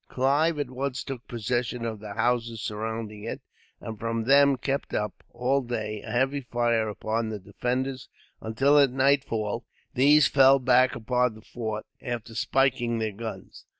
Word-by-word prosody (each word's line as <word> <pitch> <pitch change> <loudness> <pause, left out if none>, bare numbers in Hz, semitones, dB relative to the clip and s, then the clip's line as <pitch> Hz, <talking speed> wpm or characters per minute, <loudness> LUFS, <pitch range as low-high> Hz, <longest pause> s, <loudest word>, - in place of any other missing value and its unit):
Clive 145 +5 +2
at 145 -3 -3
once 130 0 -3
took 130 -4 -7
possession 120 +1 -2
of 110 -2 -4
the 105 -1 -8
houses 115 0 0
surrounding 110 0 -5
it, 115 - -5 0.4
and 110 -2 -7
from 115 0 -2
them 140 +2 +5
kept 135 +3 -2
up, 105 -1 -3
all 135 +3 0
day, 110 -4 -4
a - - -10
heavy 135 +3 +1
fire 120 -3 0
upon 110 +2 -2
the 110 - -4
defenders; 125 +7 -3 0.3
until, 135 +7 +3
at 140 -2 +5
nightfall, 125 -4 +1 0.3
these 145 +3 +6
fell 135 0 +6
back 130 0 +3
upon 125 0 0
the 110 - -14
fort, 110 -3 -5 0.2
after 115 -2 -5
spiking 120 -1 +1
their 110 -1 -1
guns. 105 -2 -8
120 Hz, 155 wpm, -26 LUFS, 110-135 Hz, 0.4 s, these